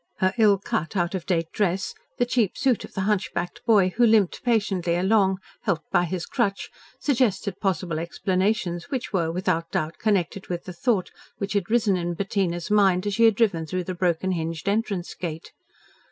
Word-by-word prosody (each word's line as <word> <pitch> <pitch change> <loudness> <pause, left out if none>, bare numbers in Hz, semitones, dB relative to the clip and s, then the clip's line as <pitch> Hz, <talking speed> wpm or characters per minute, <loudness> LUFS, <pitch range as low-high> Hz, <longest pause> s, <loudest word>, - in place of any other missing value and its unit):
Her 185 0 +2
ill 210 -3 +6
cut, 190 0 -3
out 175 0 0
of 185 -3 -4
date 165 -4 0
dress, 190 -2 0 0.2
the 245 - +2
cheap 240 -5 0
suit 265 -4 +1
of - - -11
the 195 - -1
hunchbacked 190 -3 -2
boy, 205 -5 +5
who 240 - +4
limped 220 -5 +3
patiently 200 -7 +1
along, 190 +1 +3 0.2
helped 170 -7 -2
by 175 - +3
his 175 0 -3
crutch, 200 -5 -1 0.3
suggested 215 -8 0
possible 175 -4 -1
explanations 185 +1 -1
which 255 -5 -4
were 165 -4 +1
without 165 -1 -1
doubt 155 +1 -2
connected 195 -2 0
with 175 -1 -4
the 185 - -8
thought 195 +1 0 0.3
which 200 0 -3
had 200 -2 -1
risen 220 -4 +3
in 175 0 -2
Bettina's 190 -1 -1
mind, 195 -3 +4
as 205 - -1
she 230 +2 +4
had 225 -2 +5
been 230 - +4
driven 165 -5 -6
through 185 +3 -2
the 185 - -4
broken 180 +1 0
hinged 165 -1 -3
entrance 200 -3 -1
gate. 165 -2 -6
190 Hz, 185 wpm, -25 LUFS, 175-210 Hz, 0.3 s, ill